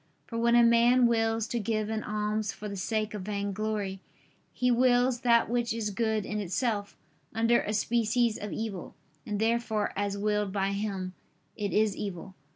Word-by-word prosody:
For 230 - -9
when 235 +1 +3
a 240 - +7
man 235 +2 +5
wills 225 -1 +2
to 240 - -1
give 215 0 -1
an 220 0 -1
alms 210 0 -1
for 210 - -8
the 200 - -5
sake 215 +2 -2
of 210 - -4
vainglory, 200 0 -3 0.5
he 250 0 +1
wills 245 0 +3
that 235 -1 +4
which 240 -1 0
is 220 -2 -2
good 220 0 0
in 210 0 -3
itself, 205 +2 -2 0.4
under 230 +1 +3
a 210 - -3
species 230 +1 +1
of 210 - -5
evil; 215 -5 -5 0.3
and 210 -1 -2
therefore, 225 -1 0
as 200 0 -1
willed 210 -1 0
by 195 0 0
him, 200 -2 -3 0.4
it 205 -2 -3
is 215 -1 +2
evil. 190 -1 -6
215 Hz, 170 wpm, -29 LUFS, 205-235 Hz, 0.5 s, a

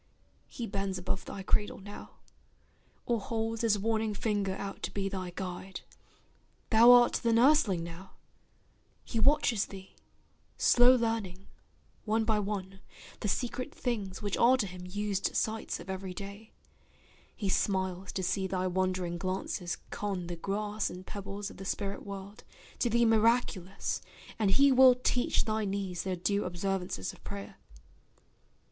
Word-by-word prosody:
He 240 - -5
bends 195 -2 -2
above 185 +1 -3
thy 195 - -6
cradle 205 +2 +1
now, 205 +1 -10 0.9
or 235 -2 +1
holds 225 +1 -2
His 220 -3 +3
warning 220 0 0
finger 205 -2 -1
out 195 0 -6
to - - -3
be 195 -1 -2
thy 185 -2 -4
guide; 185 0 -5 0.9
Thou 230 +2 +8
art 245 -1 +7
the 230 - +2
nurseling 230 - +4
now; 170 +3 -9 0.9
he 230 - -2
watches 245 -4 +3
thee 190 -1 -11 0.6
Slow 245 +1 +6
learning, 220 -6 -2 0.6
one 220 +1 +1
by 215 -1 +2
one, 195 -2 -4 0.4
the - - -2
secret 250 +6 -2
things 210 -5 -3
Which 205 -1 -1
are 250 +2 +6
to 215 - 0
him 180 -1 -8
used 205 0 -1
sights 220 0 -1
of - - -10
every 190 -1 -5
day; 200 +3 -8 0.8
He 205 - -3
smiles 190 -1 0
to 190 - -2
see 190 +1 0
thy 185 0 -1
wondering 185 -1 -1
glances 185 -1 -2
con 195 -4 -3
The 175 0 -5
grass 205 +4 -2
and 180 +1 -9
pebbles 200 +1 -6
of - - -14
the - - -7
spirit 200 +1 -3
world, 200 +2 -8 0.4
To 240 - +2
thee 235 +1 +3
miraculous; 220 -4 +1 0.4
and 210 -3 +2
he 275 +8 +5
will 260 -1 +8
teach 250 0 +1
Thy 220 -1 0
knees 195 -3 -2
their 190 -1 -2
due 200 +4 0
observances 180 - -2
of - - -18
prayer. 100 0 -7
200 Hz, 150 wpm, -31 LUFS, 190-225 Hz, 0.9 s, Thou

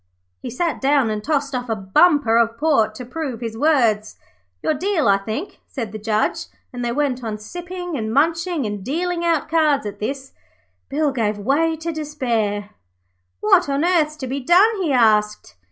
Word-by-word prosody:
He - - -5
sat 300 +3 -2
down 270 -4 +2
and 210 -1 -3
tossed 285 -1 -1
off 250 -1 -3
a 225 - 0
bumper 230 - +3
of 230 0 +1
port 225 -9 +2
to 250 - -7
prove 260 -2 -5
his 225 -2 -4
words. 230 -7 +2 0.5
'Your - - +2
deal, 330 - 0
I 195 0 +4
think,' 220 - -5
said 235 -6 -5
the 215 - -7
Judge, 215 0 -1 0.3
and 245 0 -5
they 240 - -1
went 265 -2 -1
on 220 -2 -3
sipping 355 - -7
and 220 -4 -3
munching 325 +2 +1
and 205 -2 -4
dealing 345 - -2
out 335 -3 +1
cards. 305 -5 +2
At 205 - -6
this, 270 +5 -4 0.6
Bill 295 +1 +1
gave 220 -5 -1
way 290 +10 +1
to 330 +2 -4
despair. 235 -10 -2 0.7
'What 145 - +4
on 280 +3 +1
earth's 320 -4 +2
to 295 -4 -6
be 270 +2 -3
done?' 385 - +4
he 330 -5 0
asked. 215 - +2
270 Hz, 180 wpm, -21 LUFS, 220-315 Hz, 0.7 s, I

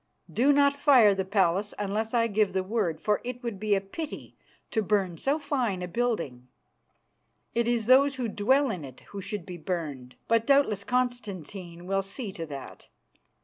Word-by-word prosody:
Do 265 +5 +4
not 280 0 +4
fire 265 -7 +6
the 190 0 -1
palace 195 0 +1
unless 210 +2 -2
I 230 -1 +4
give 210 -3 +1
the 190 -1 0
word, 190 -6 -1
for 210 +4 +1
it 250 +1 -6
would 230 -5 -4
be 210 0 +2
a 195 - 0
pity 290 +11 -7 0.4
to 220 - +1
burn 195 -3 +1
so 280 +3 +1
fine 255 -11 -1
a - - -3
building. 170 - -2 1.1
It 235 0 +1
is 235 -2 +1
those 270 +3 +5
who 250 -2 -2
dwell 260 +6 +2
in 180 -7 -5
it 130 -2 -11
who 200 - -6
should 200 -2 -5
be 180 -1 -7
burned; 150 -7 -4
but 230 0 +2
doubtless 275 -8 +3
Constantine 200 -8 -3
will 195 +1 +1
see 200 +3 -5
to 165 -3 -6
that. 140 -3 -9
210 Hz, 180 wpm, -28 LUFS, 185-245 Hz, 1.1 s, fire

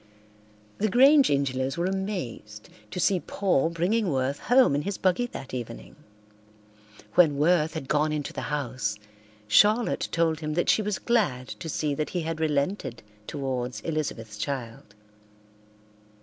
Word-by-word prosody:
The 215 - +1
Grange 275 +6 +6
Ingelows 135 -1 0
were 170 - 0
amazed 180 - -4 0.2
to - - -5
see 185 +1 +3
Paul 180 -5 0
bringing 185 +5 0
Worth 135 0 -1
home 250 - +4
in 145 - +1
his 195 +4 -3
buggy 190 +6 +1
that 135 - -9
evening. 115 - -7 1.2
When 155 -5 +5
Worth 160 +1 +2
had 155 -4 -5
gone 150 +2 +1
into 150 -2 -3
the - - -4
house 130 -7 -2 0.5
Charlotte 215 - +3
told 165 -2 +1
him 155 -1 -3
that 175 - +1
she - - +2
was 210 -1 -2
glad 180 - 0
to 165 - -7
see 150 -1 -1
that 150 +2 -2
he 180 - -2
had 160 0 -4
relented 145 - -1 0.2
towards 130 -3 -3
Elizabeth's 120 -9 -4
child. 120 -5 -5
155 Hz, 145 wpm, -26 LUFS, 130-185 Hz, 1.2 s, Grange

